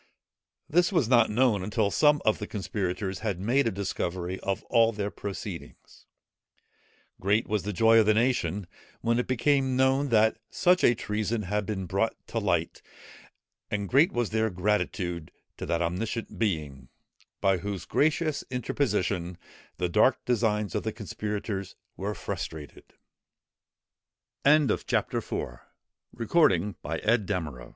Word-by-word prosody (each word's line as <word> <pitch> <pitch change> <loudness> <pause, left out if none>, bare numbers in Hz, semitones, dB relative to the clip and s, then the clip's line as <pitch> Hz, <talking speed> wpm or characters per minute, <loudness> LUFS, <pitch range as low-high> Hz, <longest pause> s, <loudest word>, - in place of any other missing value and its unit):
This 175 +5 +3
was 165 - +2
not 120 -2 +5
known 110 -3 +2
until 105 +1 0
some 150 -1 +3
of 110 - +2
the 105 - -5
conspirators 95 -2 -3
had 105 -5 -2
made 120 +7 +2
a - - +1
discovery 95 -2 -3
of 100 +1 -3
all 115 -1 +3
their 105 -2 -3
proceedings. 100 -2 -8 1.1
Great 105 +4 +1
was 105 -1 0
the 105 - -3
joy 115 +3 +5
of 110 - +3
the 110 - +4
nation 105 -6 +1 0.4
when 115 +1 +1
it 125 - -1
became 130 +1 +2
known 135 +2 +2
that 110 -1 +3
such 180 0 +3
a 120 - +5
treason 110 +1 -2
had 105 +1 -2
been 95 -3 -3
brought - - 0
to - - -1
light, - - -1 0.9
and 100 -1 -2
great 145 +6 +5
was 120 -3 -1
their 110 0 +1
gratitude 90 -3 -1 0.3
to - - -6
that 85 0 0
omniscient 105 +7 -3
Being, 75 - -2 0.5
by 95 -1 +3
whose 100 -1 -5
gracious 155 0 +1
interposition, 105 -9 -1 0.4
the 90 - 0
dark 85 - +3
designs 105 -5 0
of - - 0
the 110 - -3
conspirators 105 -2 -4 0.2
were 100 +2 -3
frustr 80 -3 -6
105 Hz, 125 wpm, -27 LUFS, 95-120 Hz, 1.1 s, not